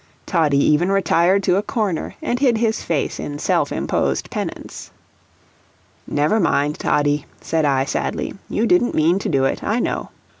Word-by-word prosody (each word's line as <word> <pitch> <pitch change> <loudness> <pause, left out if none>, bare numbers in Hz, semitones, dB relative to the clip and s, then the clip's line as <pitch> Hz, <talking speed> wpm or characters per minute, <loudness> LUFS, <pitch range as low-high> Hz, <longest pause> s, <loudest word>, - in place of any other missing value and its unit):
Toddie 155 -5 +2
even 150 +6 +3
retired 195 0 +2
to 180 - +2
a - - +2
corner 210 -5 -2
and 245 - -1
hid 250 -5 +3
his 220 -1 0
face 160 -4 -2
in 145 - -5
self - - 0
imposed 70 -1 -1
penance. - - -6 1.2
"Never 150 +9 +1
mind, 150 -5 +1
Toddie," 145 0 +1
said 160 -2 -1
I, 135 -2 +2
sadly; - - -3 0.2
"you 220 - 0
didn't 300 -4 +2
mean 165 +5 +3
to - - -3
do 135 -3 +2
it, - - -1
I 215 - 0
know." - - -2
165 Hz, 160 wpm, -20 LUFS, 145-205 Hz, 1.2 s, even